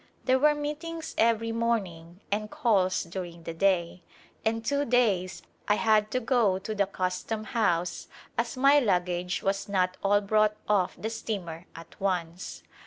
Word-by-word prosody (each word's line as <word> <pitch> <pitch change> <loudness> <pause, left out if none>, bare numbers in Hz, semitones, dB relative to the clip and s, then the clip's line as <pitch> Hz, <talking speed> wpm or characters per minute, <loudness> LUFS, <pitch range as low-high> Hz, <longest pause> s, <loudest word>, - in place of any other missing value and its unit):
There 260 0 +4
were 300 +2 +4
meetings 315 +3 -5
every 230 0 +2
morning 195 -7 -2
and 210 +1 -1
calls 190 -6 +2
during 170 -1 -7
the 165 - -5
day, 180 -1 +1 0.4
and 225 0 -1
two 285 +3 +1
days 210 -8 +1 0.2
I 210 - +4
had 215 -1 +3
to 255 - 0
go 225 -6 +2
to 205 +3 -5
the 200 -2 +1
custom 185 +3 -3
house 180 -7 0 0.3
as - - -2
my 275 +3 +6
lug 185 -9 +2
gage 180 0 -3
was 195 +1 -1
not 185 -2 +1
all 205 +1 +4
brought 215 +1 +2
off 200 -4 +2
the 220 - -3
steamer 180 -7 -5
at 165 +2 -13
once. 180 -1 -3
205 Hz, 160 wpm, -28 LUFS, 180-230 Hz, 0.4 s, my